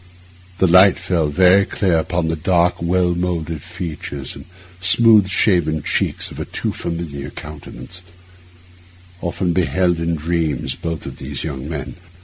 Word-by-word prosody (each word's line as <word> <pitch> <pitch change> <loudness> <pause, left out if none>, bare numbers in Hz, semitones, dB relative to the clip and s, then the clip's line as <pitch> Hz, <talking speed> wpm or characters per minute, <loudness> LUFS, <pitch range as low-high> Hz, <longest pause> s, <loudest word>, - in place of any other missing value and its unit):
The 95 - +3
light 95 +2 +6
fell 85 -4 0
very 90 +6 +5
clear 90 -4 +1
upon 85 +1 -1
the 80 - 0
dark, 85 +2 +1
well 90 +1 +2
moulded 85 -3 -2
features 75 -6 -6
and - - -11 0.3
smooth 105 +2 +5
shaven 85 -6 +1
cheeks - - -1
of - - -9
a - - -3
too - - -3
familiar 80 -4 -5
countenance, 75 +1 -9 1.2
often 85 0 -1
beheld 90 -1 +1
in 85 0 0
dreams 80 -4 -1
of - - -15
both 80 -3 -4
of - - -7
these 70 0 -6
young 70 -2 -5
men. 70 -6 -5
85 Hz, 145 wpm, -19 LUFS, 75-90 Hz, 1.2 s, light